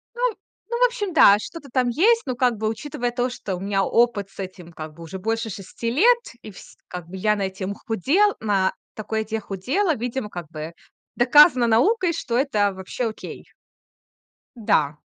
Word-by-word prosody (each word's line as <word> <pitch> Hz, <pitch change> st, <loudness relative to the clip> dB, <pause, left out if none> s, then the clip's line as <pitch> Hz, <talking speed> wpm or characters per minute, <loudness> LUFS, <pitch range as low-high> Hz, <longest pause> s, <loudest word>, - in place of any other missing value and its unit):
Ну 485 Hz, -, -5 dB, 0.5 s
ну, 475 Hz, -, -1 dB
в -, -, +8 dB
общем, 420 Hz, -7 st, -4 dB
да, 205 Hz, -9 st, +7 dB
что-то 290 Hz, +5 st, -9 dB
там 255 Hz, -1 st, +1 dB
есть. 445 Hz, -, +3 dB
Но 255 Hz, -, -2 dB
как 245 Hz, -2 st, +1 dB
бы, 215 Hz, +1 st, -1 dB
учитывая 240 Hz, +1 st, -3 dB
то, 245 Hz, 0 st, 0 dB
что 195 Hz, -5 st, -5 dB
у -, -, -8 dB
меня 195 Hz, 0 st, 0 dB
опыт 230 Hz, -4 st, +1 dB
с -, -, -22 dB
этим 180 Hz, -2 st, -8 dB
как 155 Hz, -1 st, -8 dB
бы 170 Hz, -, -13 dB
уже 190 Hz, +4 st, -7 dB
больше 225 Hz, +2 st, -2 dB
6 205 Hz, +4 st, -5 dB
лет, 470 Hz, -, +5 dB, 0.2 s
и 215 Hz, -, -9 dB
вс 190 Hz, -, -14 dB
как 180 Hz, -2 st, -7 dB
бы 190 Hz, -, -8 dB
я 210 Hz, +2 st, +1 dB
на 200 Hz, -, -3 dB
этим 190 Hz, +1 st, -4 dB
худел 280 Hz, -, +1 dB
на 200 Hz, -3 st, +1 dB, 0.2 s
такой 220 Hz, 0 st, -3 dB
еде 220 Hz, 0 st, -3 dB
худела, 270 Hz, -, -1 dB
видимо, 240 Hz, -2 st, -4 dB
как 175 Hz, -3 st, -7 dB
бы 155 Hz, +1 st, -7 dB, 0.4 s
доказано 255 Hz, 0 st, +6 dB
наукой, 340 Hz, -, +3 dB
что 240 Hz, -7 st, -3 dB
это 210 Hz, -8 st, +1 dB
вообще 190 Hz, +5 st, -4 dB
окей. 215 Hz, -, -9 dB, 1.1 s
Да. 150 Hz, -9 st, +1 dB
225 Hz, 185 wpm, -23 LUFS, 195-270 Hz, 1.1 s, в